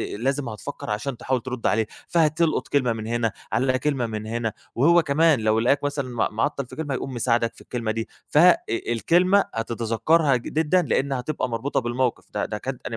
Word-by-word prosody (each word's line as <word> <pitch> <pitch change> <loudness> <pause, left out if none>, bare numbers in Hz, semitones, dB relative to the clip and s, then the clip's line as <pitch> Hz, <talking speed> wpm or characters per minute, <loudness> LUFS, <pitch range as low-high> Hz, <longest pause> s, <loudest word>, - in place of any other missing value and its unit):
أ - - -6
لازم 135 +2 -1
هتفكّر 105 0 -7
عشان 105 +5 -3
تحاول 130 0 -1
ترد 125 -1 -3
عليه، 110 +1 +1 0.2
فهتلقُط 165 0 +2
كلمة 125 -5 +1
من 110 -1 -6
هِنا 115 -2 0 0.2
على 130 +3 +1
كلمة 135 -4 0
من 110 -1 -5
هِنا، 115 0 -2 0.2
وهو 170 +8 +5
كمان 155 -1 +3
لو 110 0 +2
لقاك 140 +5 +2
مثلًا 140 -2 -2
مع 115 -2 0
معطّل 140 +5 -1
في - - -12
كلمة 145 -3 -3
هيقوم 130 +1 -4
مساعدك 115 -1 +1
في - - -15
الكلمة 115 -3 -3
دي 115 0 -3 0.2
ف - - -1
إ 175 +2 +7
الكلمة 175 - +2
هتتذكّرها 115 +7 +1
جدًا 160 +8 +1
لإنّ 140 -3 0
هتبقى 130 0 -2
مربوطة 115 +5 -1
بالمَوقِف 120 0 -1
ده - - -1
ده - - -4
كانت - - -5
الجملة - - -4
125 Hz, 195 wpm, -24 LUFS, 115-145 Hz, 0.2 s, إ